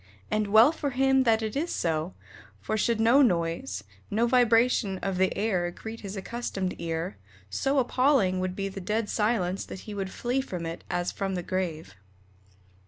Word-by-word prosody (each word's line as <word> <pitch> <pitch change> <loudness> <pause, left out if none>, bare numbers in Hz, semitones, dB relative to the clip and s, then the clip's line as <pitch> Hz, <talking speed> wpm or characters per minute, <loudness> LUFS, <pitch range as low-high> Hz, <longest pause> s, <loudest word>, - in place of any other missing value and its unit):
And 215 -1 +1
well 220 +7 +7
for 300 -3 -3
him 265 0 +3
that 225 -1 +3
it 220 +2 -3
is 325 +5 -1
so, 160 +1 -1 0.4
for 215 - -2
should 225 +1 +1
no 235 +5 +5
noise, 165 - 0 0.3
no 225 +3 +2
vibration 235 -4 +3
of 190 -2 -1
the 190 0 +3
air 185 -5 0
greet 220 +5 -8
his 200 0 -7
accustomed 195 -3 -3
ear, 165 +2 -3 0.3
so 270 - 0
appalling 250 -7 +3
would 185 0 -2
be 195 0 -2
the 195 0 -7
dead 210 +3 -1
silence 210 -4 0
that 190 - -8
he 210 - -8
would 195 -2 -3
flee 245 +6 -1
from 180 -10 -5
it 165 +1 -6
as 175 0 -1
from 195 -1 -3
the 180 - -3
grave. 170 - -3
205 Hz, 175 wpm, -27 LUFS, 180-235 Hz, 0.4 s, well